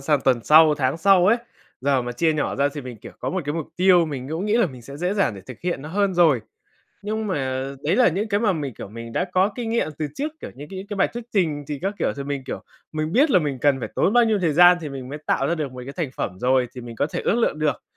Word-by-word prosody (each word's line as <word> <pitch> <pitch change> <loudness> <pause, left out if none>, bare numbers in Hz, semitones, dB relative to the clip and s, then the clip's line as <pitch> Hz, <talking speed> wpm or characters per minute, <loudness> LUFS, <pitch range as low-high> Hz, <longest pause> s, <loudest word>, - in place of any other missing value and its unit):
sang 145 0 +1
tuần 130 -3 +2
sau, 155 0 +7
tháng 135 0 0
sau 185 +1 +4
ấy. 225 +5 +5 0.4
Giờ 135 -1 +2
mà 120 0 -4
chia 160 +6 +1
nhỏ 155 -1 -1
ra 140 +1 +2
thì 145 - -4
mình, 125 -3 -8
kiểu 115 +2 -12
có - - -2
1 185 -1 -2
cái 145 - -2
mục 165 -3 -3
tiêu, 180 -2 +5
mình 135 -4 -5
cũng 160 +5 -3
nghĩ 210 +2 +2
là 235 -4 +4
mình 130 -6 -11
sẽ 140 +4 -10
dễ 180 +5 -1
dàng 195 - +1
để 100 - -9
thực 130 - -10
hiện 175 -6 -2
nó 150 - -7
hơn 195 +2 0
rồi. 165 -8 +4 0.6
Nhưng 215 +1 -3
mà, 130 -8 -2 0.2
đấy 160 +6 +1
là 250 -1 +6
những 195 +6 -2
cái 205 -1 +1
mà 215 -3 +2
mình, 145 - -4
kiểu, - - -8
mình 115 +2 -9
đã 180 - 0
có 185 +2 +3
kinh 235 -2 -3
nghiệm 230 -7 +1
từ 155 - -1
trước, 300 +2 -3
kiểu - - -7
như 145 +3 -9
những 195 +1 -7
cái 205 - -5
bài 195 - +3
thuyết 240 -1 -7
trình 155 -8 0
thì 145 -1 -4
các 195 +2 -1
kiểu, - - 0
thì 140 - -4
mình, 140 -1 -3
kiểu, - - -6 0.3
mình 155 +1 -2
biết 285 +5 +4
là 210 - +6
mình 145 -5 -2
cần 140 0 +2
phải - - -4
tốn 200 - +2
bao 240 -1 +5
nhiêu 220 -2 +2
thời 170 -5 +1
gian 175 +3 +7
thì 155 - -5
mình 135 -2 -7
mới 145 +3 -6
tạo 135 - +1
ra 170 - +1
được 150 -5 -4
1 125 - -8
cái 140 - -6
thành 160 -7 -2
phẩm 90 -1 -4
rồi, 130 0 +2
thì 125 - -7
mình 120 -1 -9
có 140 - +1
thể - - -4
ước - - +1
lượng 230 -9 +1
được. 150 -4 0
155 Hz, 305 wpm, -23 LUFS, 135-190 Hz, 0.6 s, sau